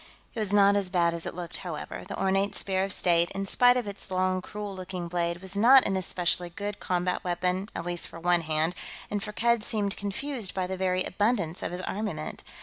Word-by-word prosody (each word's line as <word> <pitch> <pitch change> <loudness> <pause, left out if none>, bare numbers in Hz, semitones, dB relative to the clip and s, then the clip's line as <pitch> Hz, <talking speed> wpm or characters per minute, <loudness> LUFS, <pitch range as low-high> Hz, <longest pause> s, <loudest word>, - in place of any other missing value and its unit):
It 230 - -5
was 210 -3 0
not 200 0 +6
as 200 -2 0
bad 170 -2 +2
as 170 -1 -4
it - - -5
looked, 175 -1 -4
however. 170 -5 -6
The 200 - -5
ornate 195 +1 +1
Spear 190 -1 0
of 195 - -2
State, 170 -2 +3
in 195 0 -2
spite 245 +5 +5
of 245 -4 -2
its 200 -1 -7
long, 185 0 +1
cruel 205 +1 -6
looking 185 -1 -5
blade, 170 0 -1
was 190 +1 -7
not 255 +6 +7
an 195 - 0
especially 180 -1 0
good 200 +4 -5
combat 180 0 -1
weapon, 180 +3 -1
at 165 - -4
least 175 -1 -1
for 165 - -10
one 175 0 +3
hand, 160 +1 +1 0.4
and 205 -1 -1
Firkked 230 +2 +1
seemed 205 -2 -1
confused 215 +1 -3
by 185 -1 0
the 190 +1 -3
very 185 0 +1
abundance 195 -4 0
of - - -3
his 180 +1 -4
armament. 210 +3 -4
190 Hz, 215 wpm, -28 LUFS, 175-205 Hz, 0.4 s, not